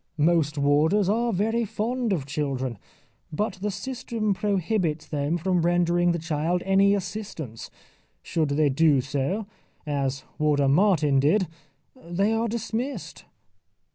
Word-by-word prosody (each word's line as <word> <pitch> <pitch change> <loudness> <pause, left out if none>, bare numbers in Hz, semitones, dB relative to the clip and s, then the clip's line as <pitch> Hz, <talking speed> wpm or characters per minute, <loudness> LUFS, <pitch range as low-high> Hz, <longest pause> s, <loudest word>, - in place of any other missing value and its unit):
Most 155 -1 +2
warders 150 +8 +3
are 235 +3 +1
very 225 +4 0
fond 230 +2 -2
of 160 -8 -1
children. 135 -5 -3 0.5
But 195 +3 -2
the 210 - -1
system 225 0 -2
prohibits 185 -5 -1
them 145 +2 -1
from 180 +1 +1
rendering 175 0 +2
the 170 - 0
child 165 +2 -1
any 195 +1 +4
assistance. 180 - -6 0.5
Should 160 -3 -1
they 145 +1 +2
do 140 -1 +3
so, 140 - -2 0.4
as 140 -2 -2 0.2
Warder 145 -2 +2
Martin 150 -3 +3
did, 180 +8 +3 0.5
they 200 -2 -1
are 225 +1 0
dismissed. 235 +4 -4
175 Hz, 125 wpm, -25 LUFS, 150-210 Hz, 0.5 s, any